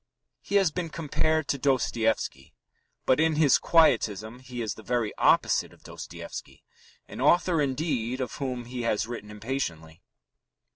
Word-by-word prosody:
He 200 - -4
has 195 -5 +4
been 170 0 -3
compared 155 0 0
to 140 - 0
Dostoevsky, 115 - 0 0.5
but 130 - +3
in 160 0 +3
his 150 -3 +5
quietism 115 - +2
he 125 -2 -6
is 110 - -2
the - - -12
very 120 -2 -1
opposite - - +3
of - - -22
Dostoevsky - - -9 0.4
an - - -8
author, 175 -2 +3
indeed, 130 -3 -1
of 130 - -3
whom 125 -3 -3
he 125 +1 -5
has 110 -2 0
written 115 -3 -7
impatiently. 100 -8 -5
125 Hz, 145 wpm, -27 LUFS, 110-150 Hz, 0.5 s, his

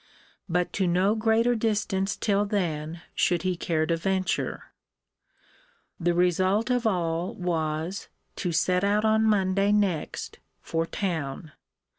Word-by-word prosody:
But 180 +1 0
to 190 -2 +1
no 185 +4 +3
greater 225 +2 +2
distance 210 -3 0
till 205 -1 +1
then 170 -5 -2
should 175 -1 +1
he 185 -1 0
care 160 -2 0
to 165 - +1
venture. 190 +2 -2 1.3
The 175 0 +1
result 185 +6 +2
of 245 -2 +1
all 170 -3 -1
was, 165 0 -2 0.3
to 175 - -1
set 180 +3 +1
out 205 +2 +2
on 220 0 +3
Monday 200 -2 +2
next 200 -6 -1 0.2
for 165 0 -2
town. 160 -6 -3
185 Hz, 125 wpm, -26 LUFS, 170-205 Hz, 1.3 s, no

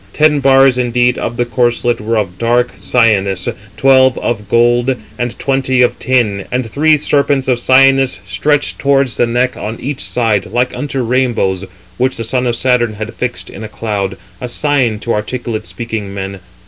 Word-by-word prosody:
Ten 150 -1 +3
bars 135 -1 +4
indeed 125 0 +1
[of 120 - -4
the 120 - +1
corslet] 120 -1 0
were 115 +2 -1
of 90 -4 -3
dark 120 +1 +1
cyanus 100 -6 +1
361, 105 +2 -7
twelve 130 -1 +4
of 105 -4 -3
gold, 120 +2 +3 0.2
and 120 -1 -3
twenty 130 -2 +1
of 125 - 0
tin; 110 -7 0
and 125 0 -1
three 150 +7 +3
serpents 140 -2 +1
of 125 -2 +1
cyanus 135 -1 +4
stretched 145 +10 0
towards 140 -3 +1
the 120 - +2
neck 125 +2 0
on 110 +2 -6
each 140 +1 -4
side, 110 -5 0
like 125 +1 -1
unto 140 -3 -3
rainbows, 115 -6 0 0.3
which 130 +1 0
the 115 - -3
son 125 +2 -1
of 120 - 0
Saturn 120 -2 +1
hath 110 +2 -6
fixed 105 -7 -4
in 105 - -9
a 110 - -7
cloud 100 -4 -3 0.2
362, - - -5
a - - -6
sign 130 -4 0
to 120 - -1
articulate 110 0 -4
speaking 110 -4 -5
men. 100 0 -6
120 Hz, 180 wpm, -14 LUFS, 110-130 Hz, 0.3 s, bars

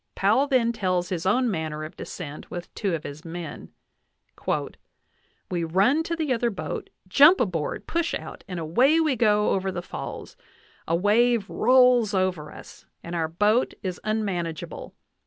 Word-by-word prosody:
Powell 220 +9 +3
then 250 -4 +2
tells 185 -5 -1
his 180 -1 -2
own 245 +4 +2
manner 155 -3 -3
of 155 - -8
descent 145 0 -8
with 175 0 -7
two 195 -5 -1
of 155 - -6
his 145 +2 -8
men: 170 -2 -7 1.8
"We 175 -2 -1
run 195 - +3
to 335 +1 -2
the 310 -5 0
other 235 0 +1
boat, 155 -8 -5 0.2
jump 290 - +7
aboard, 170 -9 -2
push 335 0 -1
out, - - -8
and 180 -3 -5
away 250 - +3
we 310 -4 +2
go 210 -3 +3
over 190 0 0
the 175 -1 -5
falls. - - -7 0.5
A 165 - +2
wave 215 +3 +3
rolls 250 -3 +4
over 180 -5 -1
us, - - -13 0.2
and 170 - -7
our 165 -2 0
boat 210 +9 +1
is 185 -2 -4
unman 210 -5 -1
ageable. 160 -1 -7
195 Hz, 160 wpm, -25 LUFS, 170-240 Hz, 1.8 s, jump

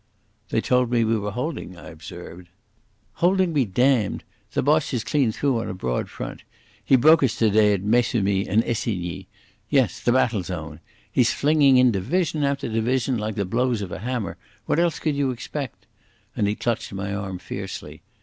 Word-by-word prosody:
"They 115 - +1
told 125 0 +2
me 120 -1 +2
we 115 0 +2
were 105 0 -3
holding," 125 - -5
I - - -10
observed. 85 +2 -10 0.7
"Holding 185 0 +3
be 140 -4 +2
damned! 120 +1 +1 0.3
The - - 0
Boche 150 -1 +2
is 115 - -1
clean 135 -6 +1
through 130 +1 0
on - - -4
a - - -4
broad 65 -9 -2
front. - - -7 0.4
He - - +4
broke 155 +6 +6
us 130 -5 +2
today 105 -1 +4
at 100 -2 -2
Maissemy 105 -3 +1
and 110 +4 +3
Essigny. 100 -7 -3 0.4
Yes, 130 - +2
the 120 - +1
battle 120 -5 +2
zone. 80 -4 -6 0.3
He's - - +3
flinging 145 -3 +4
in 125 -1 +5
division 155 - 0
after 140 0 0
division 120 +2 0
like 105 0 -3
the 100 - -1
blows 115 +2 0
of 95 - -7
a - - -5
hammer. 120 0 -3 0.3
What - - +1
else 170 -2 +2
could 155 - -1
you 140 -1 +1
expect?" 130 +1 -6 0.5
And 105 - +1
he 105 - 0
clutched 115 0 -2
my 100 +1 -3
arm 100 -2 -4
fiercely. - - -7
115 Hz, 180 wpm, -23 LUFS, 100-135 Hz, 0.7 s, broke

